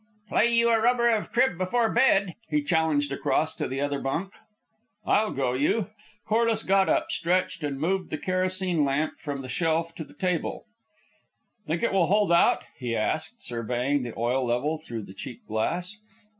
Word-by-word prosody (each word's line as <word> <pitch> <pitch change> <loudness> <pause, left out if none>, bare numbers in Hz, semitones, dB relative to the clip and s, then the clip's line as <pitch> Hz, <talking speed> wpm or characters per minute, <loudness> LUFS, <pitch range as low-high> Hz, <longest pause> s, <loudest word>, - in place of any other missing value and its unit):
"Play - - +3
you 235 0 +4
a 225 -1 +3
rubber 235 0 +3
of 220 -2 -1
crib 240 -7 +2
before 225 +6 +1
bed," 200 -7 +3 0.2
he 300 -1 +1
challenged 160 - +1
across 155 +3 0
to - - -3
the 135 +1 -4
other 145 -1 -1
bunk. 180 +9 -3 0.7
"I'll 215 +1 +3
go 130 -6 -1
you." 180 - 0 0.3
Corliss 225 0 +2
got 195 0 +3
up, 325 +1 +1
stretched, 180 -1 0
and 140 -2 -3
moved 185 +4 -1
the 155 - -3
kerosene 185 -1 0
lamp 145 +3 -1
from 140 -2 -5
the - - -7
shelf 165 +4 0
to 160 - -6
the - - -17
table, 180 0 -2 1.0
"Think 165 +5 -1
it 235 - +1
will 185 -4 +3
hold 205 -1 +2
out?" 170 - +4 0.2
he 120 -3 -2
asked, 155 - -2
surveying 125 +4 -1
the 120 -2 -6
oil 125 +3 +1
level 125 +6 0
through 120 -8 -6
the 95 - -11
cheap 115 +4 -9
glass. 175 - -2
165 Hz, 175 wpm, -26 LUFS, 140-200 Hz, 1.0 s, you